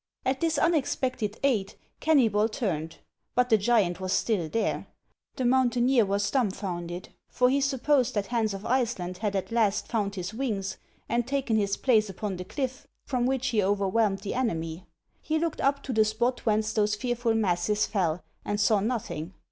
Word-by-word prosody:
At 260 +1 0
this 325 -2 +1
unexpected 260 -8 0
aid, 220 -8 +1 0.3
Kennybol 230 -8 +3
turned; 165 -8 -3 0.4
but 250 0 +3
the 220 - +7
giant 200 -5 +2
was 185 -1 -3
still 190 -9 +1
there! 225 +5 -1 0.5
The 260 - -2
mountaineer 245 -2 +3
was 200 +1 0
dumfounded; 185 -7 -2 0.2
for 250 0 +3
he 280 +1 +2
supposed 270 -2 +2
that 205 -1 0
Hans 220 -2 0
of 195 +2 -8
Iceland 230 -8 -1
had 205 -2 -1
at 195 +3 -2
last 220 -3 +1
found 205 -4 -1
his 185 +2 -4
wings 210 -6 -2 0.3
and 235 +1 0
taken 270 -4 0
his 200 -2 +1
place 220 -5 +3
upon 195 0 -4
the 180 - -6
cliff, 260 +6 -4 0.2
from 250 -2 0
which 265 0 0
he 220 -3 +2
overwhelmed 200 +1 +1
the 205 - -4
enemy. 165 -8 -2 0.3
He 315 - 0
looked 330 0 -1
up 280 +1 +1
to 265 - -3
the 220 -1 +5
spot 240 +4 -1
whence 215 0 +2
those 210 -1 +2
fearful 240 0 0
masses 205 0 +1
fell, 180 -5 -1 0.2
and 205 0 -2
saw 210 0 +4
nothing. 195 -6 -3
220 Hz, 170 wpm, -27 LUFS, 195-250 Hz, 0.5 s, the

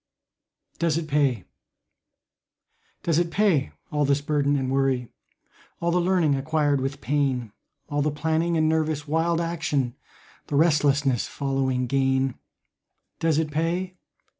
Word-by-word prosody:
DOES 165 -2 +1
IT 165 -2 -3
PAY? 140 - +1 1.6
Does 165 -1 +2
it 175 -1 0
pay 180 -7 +2 0.2
all 150 -1 +1
this 140 0 +2
burden 145 -1 +1
and 130 -2 -1
worry, 135 -3 +1 0.7
All 170 0 0
the 180 +1 +2
learning 175 -4 +2
acquired 145 0 +1
with 135 +1 -3
pain, 130 -3 0 0.4
All 145 -1 -1
the 150 - +1
planning 160 +3 0
and 155 0 +3
nervous 155 -2 0
wild 165 +2 +1
action, 160 -7 -1 0.5
The 145 - -2
restlessness 145 -5 +3
following 135 -2 -1
gain, 135 0 +1 0.9
Does 160 -2 +2
it 155 -1 0
pay? 175 +4 -2
150 Hz, 130 wpm, -25 LUFS, 135-160 Hz, 1.6 s, and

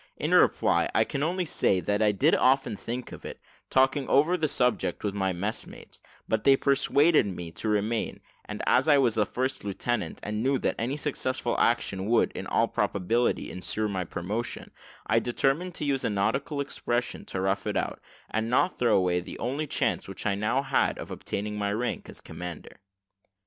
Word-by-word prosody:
In - - -1
reply, - - +4
I - - +5
can 140 - -4
only 175 +4 0
say 95 - +2
that 100 +5 -1
I 105 -1 +4
did 100 - +2
often 130 -4 +3
think 120 +5 -5
of - - -10
it, - - -7 0.3
talked 130 0 +4
over 145 +5 +3
the 160 -3 0
subject 125 -4 0
with 100 -2 -1
my 95 -2 0
messmates, 95 +4 -5 0.3
but 110 -1 0
they 135 - +6
persuaded 140 0 +3
me 90 -3 -5
to 110 - -4
remain, 105 +2 -1 0.3
and, - - -6
as 135 +4 +3
I 145 -2 +6
was 125 -5 +3
a 105 -2 +2
first 130 +1 -2
lieutenant, 100 -1 -2
and 105 +1 -3
knew 135 +3 +2
that - - 0
any 130 +5 -1
successful 130 -4 -1
action 100 -5 +1
would, 120 +1 +3
in - - -6
all - - +2
probability, 115 +6 0
insure 105 +4 -2
my 95 -3 -2
promotion, 100 +7 -5 0.3
I 110 +1 +3
determined 135 +9 0
to - - -3
use 135 -2 0
a - - +1
nautical 130 +8 0
expression, 125 -3 -2
to 95 - -4
rough 95 +1 0
it - - -1
out, - - -2 0.3
and 110 +1 -2
not 130 +9 +2
throw 120 -3 +4
away 90 -2 +2
the 90 - -8
only 140 +6 -2
chance - - 0
which - - -7
I 100 - +2
now 110 +7 0
had 135 -1 +1
of - - -8
obtaining 105 +1 -4
my 100 0 0
rank 120 +4 -3
as - - -8
commander. 90 -2 -8
115 Hz, 190 wpm, -27 LUFS, 100-135 Hz, 0.3 s, they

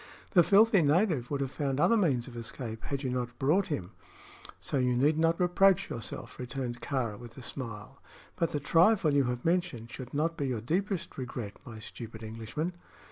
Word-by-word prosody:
"The 180 - +7
filthy 200 +2 +5
native 155 - +2
would 140 -1 -1
have 135 -1 -2
found 140 -2 -1
other 230 - +5
means 140 - +2
of 125 - -10
escape 115 -1 -6
had 140 0 -3
you 130 - -1
not 125 -1 -3
brought 155 +8 +2
him; 95 - -3 0.7
so - - -2
you 125 -1 +2
need 150 +5 +3
not 165 +1 +2
reproach 185 +1 +4
yourself," 115 - -5
returned 125 -1 -4
Kāra, 120 -7 -2
with 120 -1 -11
a 130 - -8
smile. 115 -6 -7 0.3
"But 165 - +1
the 145 - -1
trifle 165 +2 +4
you 140 -2 +4
have 125 0 -3
mentioned 165 -10 0
should 130 -1 -8
not 165 +3 0
be 140 - -1
your 125 -3 -1
deepest 185 - -2
regret, 120 -5 -5
my 115 -4 -9
stupid 110 +1 -9
Englishman!" 115 +10 -4
135 Hz, 190 wpm, -30 LUFS, 120-165 Hz, 0.7 s, The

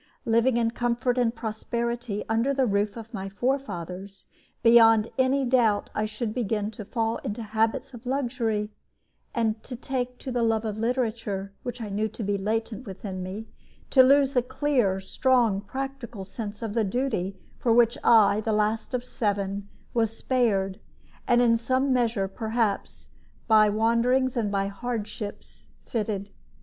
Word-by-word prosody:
Living 230 +2 +3
in 230 -1 +2
comfort 240 +1 0
and 240 -1 +1
prosperity 235 0 -3
under 230 +5 +1
the 265 -1 +3
roof 205 0 0
of 230 +1 -9
my 195 -2 -4
forefathers, 195 -5 -3 0.4
beyond 225 -1 +6
any 265 +1 +3
doubt 235 -5 +2
I 215 0 0
should 215 +1 -4
begin 215 -3 -1
to 210 -1 -8
fall 225 +1 -1
into 210 +3 -5
habits 225 +5 -1
of 240 +1 -10
luxury, 230 -5 -1 0.6
to 230 +1 -1
take 250 0 -3
to 260 - -6
the 245 -1 0
love 225 -1 +1
of 215 -1 -3
literature, 225 -5 -2
which 245 0 -5
I 220 -3 -5
knew 210 +2 0
to 220 +1 -7
be 205 0 0
latent 220 +4 -2
within 190 -1 -6
me, 195 +5 -6 0.4
to 265 - +8
lose 275 +1 +5
the 250 - +4
clear, 250 -7 +1
strong, 230 0 +2
practical 260 -3 -6
sense 205 +1 -6
of 220 -2 -3
the 230 -1 +2
duty 200 -4 -1 0.2
for 235 - +1
which 235 +1 +5
I, 215 -2 +5
the 220 0 -1
last 215 +3 0
of 245 - -2
seven, 200 -4 -2 0.2
was 225 -1 0
spared, 205 -6 +1 0.5
and 245 -1 +5
in 230 -1 +4
some 260 +3 +1
measure, 230 -5 +1
perhaps, 220 0 -2 0.4
by 215 -2 +6
wanderings 235 +4 +2
and 220 -4 0
by 195 -1 +1
hardships, 210 0 -6 0.2
fitted. 205 -3 -3
225 Hz, 155 wpm, -26 LUFS, 205-245 Hz, 0.6 s, to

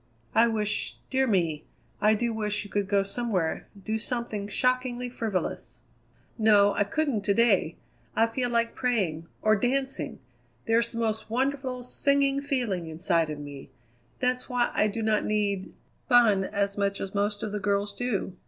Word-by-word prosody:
"I 230 +1 +5
wish 210 -2 -1
dear 265 0 +2
me! 165 -8 +1 0.4
I 215 +1 +5
do 235 +2 -1
wish 210 -1 -1
you 205 - -12
could 205 -1 0
go 200 -1 +2
somewhere; 195 -5 -2 0.2
do 220 0 -1
something 225 -4 -2
shockingly 250 +2 0
frivolous." 220 -6 -3 0.6
"No, 205 -2 +5
I 205 - +1
couldn't 275 0 0
to 200 - +2
day. 200 -8 +3 0.4
I 225 - +4
feel 245 +2 -2
like 235 -1 +1
praying 185 -11 -1 0.2
or 215 0 +5
dancing. 255 - -1 0.5
There's 230 +1 +2
the 230 - -7
most 220 -1 -1
wonderful, 260 +1 -1
singing 280 +2 +1
feeling 240 - -1
inside 165 0 +1
of 150 - -4
me. 145 -2 -9 0.5
That's 250 0 0
why 245 -1 +1
I 210 - +3
do 220 +2 -3
not 215 -1 +2
need 205 -2 -1 0.4
fun 225 -6 +5
as 200 0 -1
much 200 0 0
as 195 - -5
most 205 0 -1
of 215 - -3
the 210 - -2
girls 200 +1 0
do. 205 -5 -2
215 Hz, 160 wpm, -27 LUFS, 200-245 Hz, 0.6 s, I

